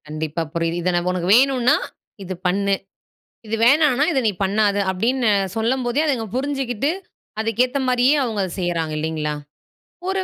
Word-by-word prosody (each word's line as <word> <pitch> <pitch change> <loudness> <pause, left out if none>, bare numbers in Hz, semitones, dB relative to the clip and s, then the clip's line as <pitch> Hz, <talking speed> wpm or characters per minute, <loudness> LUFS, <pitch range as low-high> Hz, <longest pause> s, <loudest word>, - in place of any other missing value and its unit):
கண்டிப்பா 155 +1 -3
புரியிது. 165 +1 -1
இதை 180 - +1
நான் 175 +1 0
உனக்கு 180 -1 -2
வேணுனா 255 -2 +3 0.5
இது 190 0 -5
பண்ணு, 200 +2 +1 0.7
இது 220 +1 -2
வேணானா 290 0 +4
இதை 270 - +2
நீ 215 - +2
பண்ணாத 205 +1 +1
அப்படின்னு 235 +5 +1 0.3
சொல்லும்போதே 240 +3 0
அதங்க 250 -7 -1
புரிஞ்சுக்கிட்டு, 270 -1 -1 0.5
அதுக்குகேத்த 245 +4 0
மாரியே 250 +3 +4
அவங்க 220 -4 -2
அத 185 - -5
செய்கிறாங்க 170 -3 -1
இல்லைங்களா, 155 -1 -2 0.8
ஒரு 385 0 0
220 Hz, 140 wpm, -21 LUFS, 175-255 Hz, 0.8 s, வேணானா